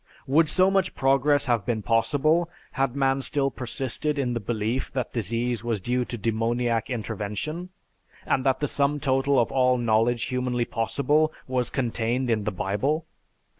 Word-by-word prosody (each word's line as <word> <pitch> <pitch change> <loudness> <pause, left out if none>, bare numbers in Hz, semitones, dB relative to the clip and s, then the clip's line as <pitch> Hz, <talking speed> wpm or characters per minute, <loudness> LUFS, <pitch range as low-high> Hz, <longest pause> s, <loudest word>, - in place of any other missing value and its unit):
Would 150 +3 +3
so 185 +4 +4
much 190 -2 +1
progress 140 +2 +3
have 120 -5 +1
been 110 0 -2
possible 145 - +2 0.2
had 135 -1 -1
man 135 -1 +2
still 135 0 0
persisted 135 +4 -3
in 125 -3 0
the 120 - -1
belief 110 +3 -2
that 130 -2 -3
disease 115 +1 -1
was 115 -3 -1
due 125 +5 -1
to 120 - -5
demoniac 115 +1 0
intervention, 115 - -4 0.6
and 130 - +1
that 135 0 +1
the 145 - +1
sum 145 +1 0
total 135 0 +2
of 115 - +1
all 125 -1 +3
knowledge 115 0 +2
humanly 125 -1 -1
possible 145 +8 +1 0.2
was 125 -1 0
contained 120 0 -1
in 110 -2 0
the 105 - 0
Bible? 105 - -1
125 Hz, 160 wpm, -25 LUFS, 115-140 Hz, 0.6 s, so